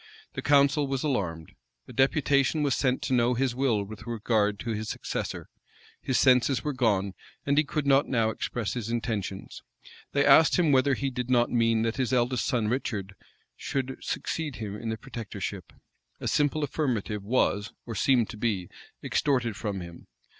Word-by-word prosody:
The -, -, -4 dB
council 140 Hz, 0 st, +4 dB
was 135 Hz, -1 st, -2 dB
alarmed. 90 Hz, -, -2 dB, 0.4 s
A -, -, -11 dB
deputation 140 Hz, +2 st, +2 dB
was 140 Hz, -3 st, +2 dB
sent 130 Hz, -1 st, 0 dB
to 130 Hz, -, -1 dB
know 125 Hz, 0 st, +3 dB
his 130 Hz, 0 st, 0 dB
will 120 Hz, -5 st, +1 dB
with 110 Hz, +3 st, -10 dB
regard 110 Hz, -2 st, +1 dB
to 120 Hz, -, -3 dB
his 110 Hz, 0 st, -3 dB
successor -, -, -4 dB, 0.5 s
His 130 Hz, -, 0 dB
senses 130 Hz, 0 st, +4 dB
were 150 Hz, -, -1 dB
gone, 100 Hz, -7 st, +1 dB, 0.3 s
and 140 Hz, -, +2 dB
he 150 Hz, -, +4 dB
could 150 Hz, 0 st, -3 dB
not 140 Hz, 0 st, +4 dB
now 115 Hz, -3 st, +1 dB
express 115 Hz, -1 st, -3 dB
his 115 Hz, -3 st, -4 dB
intentions. 110 Hz, -5 st, -4 dB, 0.5 s
They 140 Hz, 0 st, +3 dB
asked 145 Hz, +3 st, +6 dB
him 170 Hz, -5 st, +3 dB
whether 135 Hz, 0 st, +4 dB
he 135 Hz, +2 st, -2 dB
did 125 Hz, -1 st, -4 dB
not 120 Hz, -1 st, +3 dB
mean 115 Hz, -2 st, +2 dB
that 115 Hz, +2 st, -1 dB
his 130 Hz, -2 st, 0 dB
eldest 120 Hz, -3 st, +1 dB
son, 120 Hz, -5 st, 0 dB
Richard, 105 Hz, -5 st, -2 dB, 0.4 s
should 135 Hz, -1 st, -3 dB
succeed 155 Hz, -5 st, -3 dB
him 105 Hz, -3 st, -5 dB
in 115 Hz, +2 st, -5 dB
the 110 Hz, -, -2 dB
protectorship. 120 Hz, -4 st, -6 dB, 0.5 s
A -, -, -4 dB
simple 150 Hz, +1 st, +1 dB
affirmative 120 Hz, -8 st, -2 dB
was, 105 Hz, -2 st, +1 dB
or 115 Hz, -, -5 dB
seemed 120 Hz, +1 st, +3 dB
to -, -, -10 dB
be, 105 Hz, -5 st, -1 dB, 0.3 s
extorted 125 Hz, -6 st, 0 dB
from 100 Hz, -3 st, -4 dB
him. 85 Hz, -1 st, -11 dB
120 Hz, 175 wpm, -27 LUFS, 110-135 Hz, 0.5 s, asked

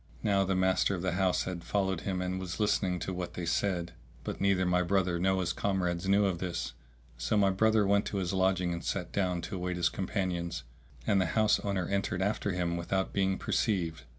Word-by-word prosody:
Now 100 Hz, -2 st, +3 dB
the 95 Hz, 0 st, 0 dB
master 95 Hz, +1 st, +2 dB
of 90 Hz, -, -5 dB
the 95 Hz, -, +1 dB
house 95 Hz, 0 st, +1 dB
had 90 Hz, -2 st, -5 dB
followed 95 Hz, -4 st, 0 dB
him 95 Hz, -2 st, -2 dB
and 90 Hz, +1 st, -2 dB
was 90 Hz, 0 st, -5 dB
listening 100 Hz, -3 st, +1 dB
to 95 Hz, -, -3 dB
what 90 Hz, -1 st, -5 dB
they 90 Hz, -, -3 dB
said; 85 Hz, 0 st, 0 dB, 0.3 s
but -, -, -5 dB
neither 95 Hz, -2 st, +3 dB
my 90 Hz, 0 st, +3 dB
brother 90 Hz, -1 st, +1 dB
nor 95 Hz, +1 st, +2 dB
his 85 Hz, -1 st, -1 dB
comrades 90 Hz, -2 st, -1 dB
knew 100 Hz, +1 st, +4 dB
of 90 Hz, -3 st, 0 dB
this. 85 Hz, -2 st, -3 dB, 0.5 s
So -, -, +1 dB
my 100 Hz, -1 st, +4 dB
brother 110 Hz, +2 st, +3 dB
went 100 Hz, +1 st, +3 dB
to 100 Hz, -, -3 dB
his 95 Hz, -1 st, -1 dB
lodging 95 Hz, -2 st, +2 dB
and 85 Hz, -, -5 dB
sat 90 Hz, -3 st, -2 dB
down 90 Hz, -3 st, 0 dB
to 95 Hz, +3 st, -5 dB
await 90 Hz, 0 st, -2 dB
his 85 Hz, -, +2 dB
companions, 90 Hz, -, -2 dB, 0.4 s
and 100 Hz, -2 st, +3 dB
the 95 Hz, -, +1 dB
house 110 Hz, -1 st, +4 dB
owner 100 Hz, -3 st, -1 dB
entered 100 Hz, -1 st, -1 dB
after 105 Hz, 0 st, 0 dB
him 85 Hz, -2 st, -1 dB
without 95 Hz, +3 st, -1 dB
being 95 Hz, -1 st, +1 dB
perceived. 85 Hz, -, 0 dB
95 Hz, 210 wpm, -30 LUFS, 90-100 Hz, 0.5 s, knew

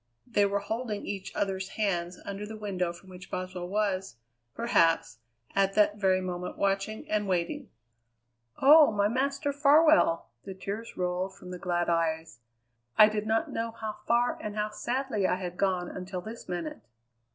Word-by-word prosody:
They 205 Hz, -5 st, +2 dB
were 200 Hz, 0 st, -1 dB
holding 220 Hz, 0 st, -3 dB
each 195 Hz, -2 st, -5 dB
other's 195 Hz, -1 st, -1 dB
hands 180 Hz, -4 st, -1 dB
under 200 Hz, +1 st, -5 dB
the 215 Hz, +1 st, -7 dB
window 185 Hz, -4 st, -2 dB
from 180 Hz, +2 st, -14 dB
which 185 Hz, 0 st, -11 dB
Boswell 185 Hz, -1 st, -4 dB
was, 195 Hz, -, -1 dB, 0.4 s
perhaps, 165 Hz, -, +2 dB, 0.3 s
at 195 Hz, 0 st, +2 dB
that 210 Hz, 0 st, +4 dB
very 190 Hz, -2 st, +2 dB
moment 180 Hz, -1 st, -4 dB
watching 200 Hz, +2 st, -1 dB
and 210 Hz, -1 st, 0 dB
waiting. 175 Hz, -2 st, -1 dB, 0.9 s
"Oh! 300 Hz, +2 st, +8 dB
my 205 Hz, -1 st, +2 dB
Master 275 Hz, +5 st, 0 dB
Farwell!" 290 Hz, -, +5 dB, 0.2 s
The 190 Hz, -, -7 dB
tears 205 Hz, +4 st, -6 dB
rolled 180 Hz, +1 st, -1 dB
from 180 Hz, -1 st, -11 dB
the 180 Hz, -, -6 dB
glad 175 Hz, -1 st, 0 dB
eyes. 160 Hz, -4 st, 0 dB, 0.6 s
"I 215 Hz, 0 st, +9 dB
did 215 Hz, 0 st, -3 dB
not 225 Hz, +1 st, +1 dB
know 230 Hz, 0 st, -3 dB
how 220 Hz, -2 st, -5 dB
far 240 Hz, +1 st, +2 dB
and 210 Hz, -1 st, -5 dB
how 210 Hz, 0 st, -1 dB
sadly 240 Hz, -2 st, -1 dB
I -, -, +2 dB
had 180 Hz, -1 st, -5 dB
gone 185 Hz, -2 st, 0 dB
until 185 Hz, 0 st, -5 dB
this 220 Hz, +1 st, -9 dB
minute!" 175 Hz, -3 st, -4 dB
195 Hz, 165 wpm, -29 LUFS, 180-215 Hz, 0.9 s, I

